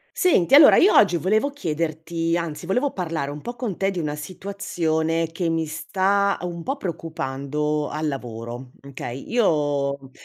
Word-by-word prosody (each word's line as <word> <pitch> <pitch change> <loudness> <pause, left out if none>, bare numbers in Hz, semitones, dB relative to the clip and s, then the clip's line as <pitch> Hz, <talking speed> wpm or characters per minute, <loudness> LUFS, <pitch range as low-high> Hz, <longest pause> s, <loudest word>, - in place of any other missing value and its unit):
Senti, 280 - +3
allora 290 0 +9
io 395 - +6
oggi 180 -4 +5
volevo 215 - +1
chiederti 165 - -2
anzi 170 -1 -4
volevo 250 +10 +1
parlare 160 -6 -3
un 145 +1 -7
po' 240 +10 -6
con 230 -6 -4
te 195 0 0
di 180 - -3
una 150 -2 -3
situazione, 165 -2 -2
che 170 +1 -2
mi 165 -1 0
sta 195 +5 +1
un 170 -1 -5
po' 275 - -2
preoccupando 150 - -3
al 155 +1 -2
lavoro, 120 -1 -6 0.2
okay. 135 -1 -7
Io 145 - 0
165 Hz, 150 wpm, -23 LUFS, 150-195 Hz, 0.2 s, allora